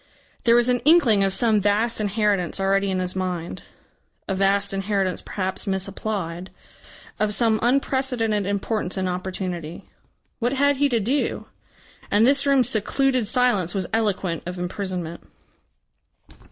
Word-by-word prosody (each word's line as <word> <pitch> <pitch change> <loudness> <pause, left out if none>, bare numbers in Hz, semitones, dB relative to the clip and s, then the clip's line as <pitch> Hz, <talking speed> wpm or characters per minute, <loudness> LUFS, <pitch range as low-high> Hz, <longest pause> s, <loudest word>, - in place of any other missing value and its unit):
There 235 0 +6
was 240 0 +3
an 250 0 +2
inkling 255 -8 +4
of 195 - +1
some 215 +1 +2
vast 215 +3 +1
inheritance 205 -4 0
already 195 +1 +1
in 190 - -1
his 185 0 -2
mind 180 -3 -3 0.7
a 195 - -1
vast 200 +1 +1
inheritance 195 -1 -1
perhaps 190 0 -4
misapplied 190 -2 -3 0.7
of 210 0 +1
some 225 -2 +2
unprecedented 245 -5 0
importance 200 -1 -2
and 190 -1 -1
opportunity. 180 -2 -5 0.5
What 245 +2 0
had 285 +1 +2
he 285 +1 +2
to 235 -3 +1
do? 255 +8 -1 0.6
And 210 +2 +4
this 280 +2 +3
room's 270 -4 +3
secluded 255 +2 +1
silence 210 -7 +1
was 190 -2 0
eloquent 195 -6 0
of 180 0 -5
imprisonment! 180 -2 -4
205 Hz, 135 wpm, -23 LUFS, 185-235 Hz, 0.7 s, There